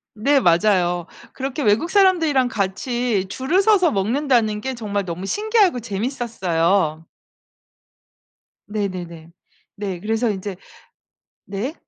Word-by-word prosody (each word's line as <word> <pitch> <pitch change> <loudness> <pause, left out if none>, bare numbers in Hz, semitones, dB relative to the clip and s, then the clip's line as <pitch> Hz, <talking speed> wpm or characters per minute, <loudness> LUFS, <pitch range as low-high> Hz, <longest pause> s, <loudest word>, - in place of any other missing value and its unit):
네. 275 +6 +3
맞아요. 175 -2 +2 0.3
그렇게 270 +2 -4
외국 225 +9 +2
사람들이랑 330 -10 +3
같이 220 0 -1
줄을 295 - +1
서서 385 -6 +4
먹는다는 225 +1 +1
게 265 +5 -4
정말 205 -4 -3
너무 175 +2 -5
신기하고 415 - +2
재밌었어요. 195 - -1 1.6
네네네. 180 -6 -5 0.4
네. 195 -4 -4
그래서 225 +4 0
인제 200 -1 -4 0.9
네. 205 +9 -4
215 Hz, 245 characters per minute, -21 LUFS, 190-265 Hz, 1.6 s, 서서